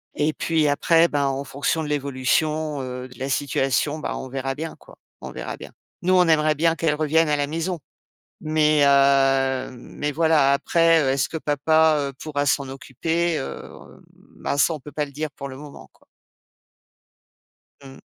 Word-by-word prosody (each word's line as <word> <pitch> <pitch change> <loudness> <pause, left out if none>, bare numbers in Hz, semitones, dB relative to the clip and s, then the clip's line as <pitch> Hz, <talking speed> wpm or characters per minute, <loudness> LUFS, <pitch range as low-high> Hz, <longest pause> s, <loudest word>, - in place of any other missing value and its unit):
et 150 +2 0
puis 160 -2 0
après 165 +4 +3
bah, 145 -1 0
en 135 +1 -2
fonction 140 +4 -2
de 150 - -5
l'évolution, 145 +2 -1
heu, 125 0 -6
de 125 - -16
la 135 +1 -3
situation, 140 +2 0
bah - - -4
on 130 - -7
verra 135 0 -3
bien 160 +3 -6
quoi, - - -17 0.3
on - - -7
verra - - -6
bien. - - -11 0.3
Nous, 185 +1 +1
on 180 -2 +5
aimerait 155 -1 +3
bien 165 +2 +2
qu'elle 160 -3 0
revienne 155 +1 +2
à 150 - +2
la 145 -1 -1
maison. 165 +3 -3 0.6
Mais 155 -1 +2
heu, 135 -1 +3
mais 145 +4 -5
voilà, 155 -3 +3
après 165 +3 +3
heu, 135 - +1
est-ce 135 0 +1
que 160 - -5
papa, 155 +2 +2 0.2
heu, - - -23
pourra 145 -2 -2
s'en 140 -1 0
occuper? 165 +6 -2
Heu, 70 - -6 0.7
bah, 140 - -3
ça, 165 - +3
on - - -3
ne 150 - -10
peut 150 - -11
pas 150 0 -2
le 140 - -13
dire 150 +1 -4
pour 140 - -8
le 130 - -9
moment, 145 0 -12
quoi. - - -29 1.8
Mmh. 135 -1 -12
145 Hz, 185 wpm, -23 LUFS, 135-160 Hz, 1.8 s, on